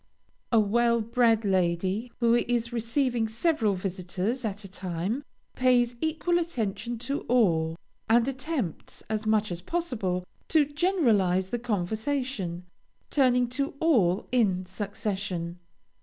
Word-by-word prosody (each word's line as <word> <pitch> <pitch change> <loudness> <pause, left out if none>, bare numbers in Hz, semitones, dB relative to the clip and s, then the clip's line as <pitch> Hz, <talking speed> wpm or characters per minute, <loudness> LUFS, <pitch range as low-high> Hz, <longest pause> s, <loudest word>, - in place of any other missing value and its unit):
A 230 - +5
well 235 +3 +3
bred 230 -1 +2
lady, 190 +4 0
who 235 0 +4
is 240 0 +1
receiving 235 0 0
several 225 - +1
visitors 190 +6 -3
at 210 -1 -3
a - - -7
time, 185 - -3 0.3
pays 245 -1 +3
equal 330 +2 +1
attention 235 - -3
to 280 +2 -1
all, 165 -10 +3 0.3
and 235 +2 +4
attempts, 260 - -4
as 215 0 -2
much 215 -2 +2
as 175 0 -4
possible, 210 - -2 0.2
to 310 -2 +4
generalize 235 - +2
the 240 - -1
conversation, 220 -3 -2 0.5
turning 250 -3 +3
to 275 +3 -2
all 210 - +3
in 195 -7 +2
succession. 190 -3 -4
225 Hz, 120 wpm, -27 LUFS, 190-250 Hz, 0.5 s, A